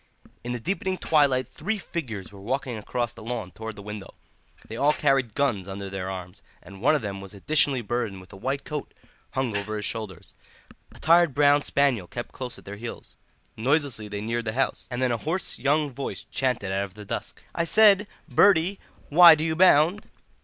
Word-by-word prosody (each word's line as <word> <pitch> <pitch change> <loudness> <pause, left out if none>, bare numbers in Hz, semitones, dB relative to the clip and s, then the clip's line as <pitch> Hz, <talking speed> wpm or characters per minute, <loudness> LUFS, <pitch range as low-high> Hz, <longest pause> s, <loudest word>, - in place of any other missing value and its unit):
In 120 - -4
the 125 - -3
deepening 190 - -2
twilight 140 -7 +2
three 210 +8 -3
figures 120 - -5
were 100 -1 -13
walking 130 +3 -2
across 120 +2 -3
the - - -12
lawn 110 -4 -4
towards 110 +1 -7
the 100 - -10
window; 105 -1 -8 0.5
they 110 - -7
all 145 +5 +3
carried 135 -7 +1
guns 120 -10 0
under 100 0 -6
their 95 -1 -4
arms, 90 -2 -7 0.2
and 95 +2 -12
one 145 +6 +4
of 145 - -1
them 100 -2 -4
was 100 +1 -10
additionally 135 +3 +3
burdened 115 -3 -2
with 95 - -15
a - - -9
white 135 +7 -3
coat 150 -2 -6 0.4
hung 130 -5 -1
over 100 +2 -2
his 105 - -2
shoulders. 110 -6 -4 0.6
A - - -16
tired 165 -3 +4
brown 145 0 +5
spaniel 135 -11 +1
kept 120 +5 -6
close 125 -2 -7
at - - -16
their 100 +1 -7
heels. 115 +2 -8 0.4
Noiselessly 130 -2 0
they 100 0 -5
neared 115 +2 -2
the 110 - -2
house, 135 +3 -1
and 125 0 -2
then 125 - +2
a 120 - 0
hoarse 165 +9 -2
young 145 +3 +1
voice 135 +2 -5
chanted 125 -7 -1
out 100 +1 0
of 95 -1 -15
the 105 -1 -10
dusk: - - -5
"I 170 - 0
said, 205 +3 +5 0.2
Bertie, 190 0 +4 0.3
why 170 +1 +9
do 155 - -3
you 160 0 0
bound?" 175 +2 +4
125 Hz, 200 wpm, -25 LUFS, 105-150 Hz, 0.6 s, why